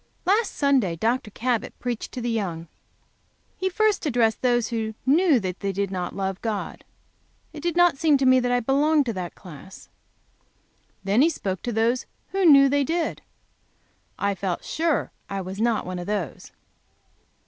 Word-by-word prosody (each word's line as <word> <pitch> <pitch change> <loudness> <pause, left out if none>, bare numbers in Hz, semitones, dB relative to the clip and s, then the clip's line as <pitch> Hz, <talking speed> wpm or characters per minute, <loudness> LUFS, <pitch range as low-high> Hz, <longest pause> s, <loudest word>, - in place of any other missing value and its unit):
LAST 410 +4 +2
Sunday 265 - +2
Dr. 225 +6 -1
Cabot 235 +1 -2
preached 245 -2 -4
to 250 - -5
the 240 - -2
young. 175 -7 -3 0.9
He 375 - -1
first 425 +1 +1
addressed 230 -4 +1
those 240 -2 +2
who 220 -2 -3
knew 300 0 +4
they 185 -3 -3 0.2
did 195 0 -2
not 180 -2 -4
love 190 -1 -3
God. 215 -3 -4 0.7
It 300 - -8
did 340 0 -1
not 350 -5 +4
seem 310 -3 +4
to 270 - 0
me 255 0 +6
that 245 0 -1
I 245 0 +2
belonged 285 +4 +2
to 230 - -2
that 180 -3 -6
class. 180 +1 -13 1.1
Then 200 +5 +2
he 320 - +5
spoke 190 - -4
to 240 - -3
those 230 +3 0 0.2
who 390 -1 0
knew 275 -2 +8
they 285 +1 +2
did. 330 +3 -2 1.0
I 200 0 0
felt 185 -2 -4
sure 325 -1 0 0.2
I 195 - -3
was 190 +3 -6
not 230 -2 +1
one 185 0 -5
of 175 - -7
those. 200 -8 -4
240 Hz, 170 wpm, -24 LUFS, 195-285 Hz, 1.1 s, knew